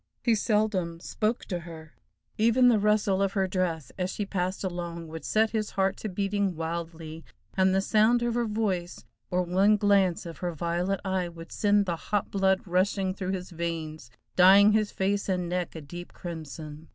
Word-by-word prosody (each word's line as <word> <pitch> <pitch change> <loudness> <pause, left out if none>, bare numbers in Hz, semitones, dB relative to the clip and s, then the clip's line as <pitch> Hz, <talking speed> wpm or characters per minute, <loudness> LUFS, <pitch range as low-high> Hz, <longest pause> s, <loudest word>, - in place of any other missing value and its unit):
He 235 - +3
seldom 210 -6 0
spoke 215 +6 -2
to 180 -3 -3
her. 165 -2 -11 0.4
Even 235 +3 +4
the 225 -3 +4
rustle 205 -2 +2
of 195 -1 +1
her 195 -2 +1
dress 180 -5 -2
as 180 0 0
she 205 +2 -3
passed 185 -1 -2
along 170 -2 -4
would 160 0 -7
set 220 0 +2
his 215 -2 -1
heart 190 0 +2
to 215 - -5
beating 200 0 -1
wildly, 165 0 -5 0.3
and 190 0 +3
the 190 +1 +2
sound 220 +4 +3
of 240 -1 0
her 240 0 0
voice, 195 -5 -2 0.2
or 180 0 +1
one 195 +4 +3
glance 195 -4 +2
of 165 -1 -8
her 175 -1 -2
violet 175 +4 -1
eye 190 -2 -1
would 165 0 -11
send 205 -1 +2
the 170 -3 -2
hot 205 +4 -2
blood 190 -1 +2
rushing 185 +1 +1
through 190 0 -3
his 185 0 -5
veins, 160 -5 -5 0.3
dyeing 195 +3 +7
his 215 -1 +1
face 200 +1 -1
and 180 -2 0
neck 180 -1 -3
a 160 - -6
deep 175 +4 -9
crimson. 155 -2 -8
185 Hz, 185 wpm, -27 LUFS, 170-205 Hz, 0.4 s, dyeing